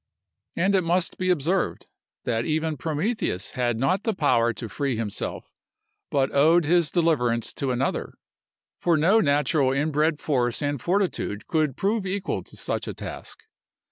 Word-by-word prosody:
And 190 +3 +2
it 190 - +4
must 175 +2 0
be 185 0 0
observed, 180 +2 0 0.4
that 115 -2 0
even 155 +2 -1
Prometheus 155 - -2
had 120 -2 -1
not 135 - +1
the 220 -1 -1
power 120 -8 +3
to 115 +1 -7
free 130 +3 -2
himself, 110 -3 -4 0.6
but 135 -1 +1
owed 160 +4 +5
his 170 0 +3
deliverance 125 -10 +1
to 135 - -2
another; 125 +2 -2 0.6
for 170 -2 +2
no 185 +9 +4
natural 140 -2 +2
inbred 150 +2 +1
force 125 -2 0
and 145 -3 -1
fortitude 180 - -1
could 155 -5 0
prove 200 0 0
equal 195 +1 -2
to - - -11
such - - -3
a - - -5
task. - - -7
150 Hz, 150 wpm, -25 LUFS, 130-175 Hz, 0.6 s, owed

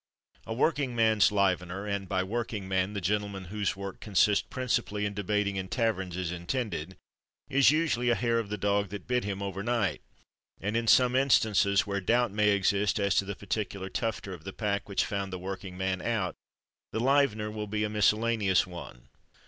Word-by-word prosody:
A 110 - -2
Working 140 -2 +1
Man's 110 -3 +4
Livener, 95 -1 0
(and 100 -2 -3
by 95 -1 +1
"working 110 -1 -3
man" 95 +1 0
the 100 - -3
gentleman 100 +1 -1
whose 100 -2 -1
work 100 0 -7
consists 105 0 +3
principally 115 -5 -1
in 100 - -2
debating 105 0 -1
in 95 0 -3
taverns 95 -5 -1
is 90 -2 -2
intended) 90 - -3 0.5
is 135 -1 +5
usually 150 -6 +2
a 120 - +4
hair 115 -1 +1
of 110 -3 -4
the 105 - -3
dog 100 0 +1
that 100 -1 -7
bit 125 0 0
him 100 -1 -3
over 100 0 -4
night; 115 -2 0 0.6
and 105 +3 -2
in 115 0 0
some 125 +2 +5
instances 105 -7 +3
where 100 -1 -2
doubt 120 +3 +2
may 105 +1 +2
exist 100 +1 +2
as 100 -1 +2
to 100 - +2
the 100 0 -4
particular 100 -1 -4
"tufter" 110 -3 -3
of 85 -4 -10
the 95 - -7
pack 100 -2 -2
which 100 - +1
found 100 -1 -3
the 95 - -4
working 95 0 -6
man 95 -1 -1
out, 110 -6 -1 0.6
the - - -2
livener 120 -5 +2
will 105 -1 -4
be 105 +1 -1
a - - +1
miscellaneous 105 -1 +2
one. 85 -9 -10
100 Hz, 190 wpm, -29 LUFS, 95-115 Hz, 0.6 s, is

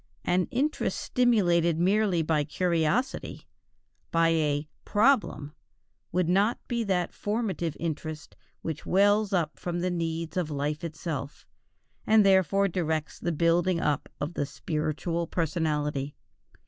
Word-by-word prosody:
An 180 0 +2
interest 290 +5 -1
stimulated 175 - +2
merely 190 -1 +2
by 155 -1 +1
curiosity, 170 - -1 0.7
by 165 -2 +3
a 150 -2 +1 0.2
"problem," 210 - +2 0.6
would 180 -2 +1
not 200 +6 +3
be 235 -1 -1
that 180 -3 0
formative 200 -7 -2
interest 155 -2 -5 0.3
which 160 -2 -4
wells 205 +2 +3
up 170 -5 -1
from 175 -1 -3
the 180 +1 0
needs 165 0 -3
of 175 -4 0
life 150 +2 -2
itself, 155 -3 -5 0.6
and 215 -1 +6
therefore 195 0 +4
directs 160 -4 -2
the 170 - -1
building 170 +2 +2
up 150 -4 -1
of 145 +4 -3
the 145 - -2
spiritual 155 +2 -2
personality. 150 -4 -1
170 Hz, 120 wpm, -28 LUFS, 155-190 Hz, 0.7 s, and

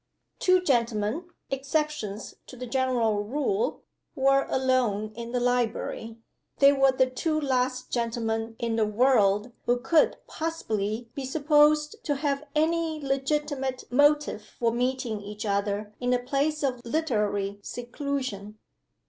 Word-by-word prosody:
Two 365 0 +4
gentlemen 235 - 0 0.3
(exceptions 275 -6 -2
to - - -10
the 250 - -5
general 235 -4 +1
rule) 300 - -1 0.3
were 275 +1 +3
alone 245 -5 +1
in 235 0 -6
the 250 - 0
library. 235 -2 -1 0.4
They 280 0 +7
were 270 -1 +4
the 260 0 +3
two 310 +5 -1
last 255 -2 -1
gentlemen 225 -1 -2
in 230 -1 -1
the 220 - +3
would 210 -1 +3 0.2
who 245 - +3
could 285 +6 +3
possibly 230 -8 -3
be 275 - -5
supposed 300 +2 +3
to 290 - 0
have 280 0 -1
any 320 0 +1
legitimate 270 -1 -1
motive 290 -4 +3
for 230 +2 -1
meeting 245 -2 -1
each 210 +1 -7
other 205 +1 -1
in 245 0 +1
a - - +4
place 285 +4 -1
of 250 -3 -1
literary 210 -8 -1
seclusion. 245 -4 -4
255 Hz, 130 wpm, -27 LUFS, 225-285 Hz, 0.4 s, They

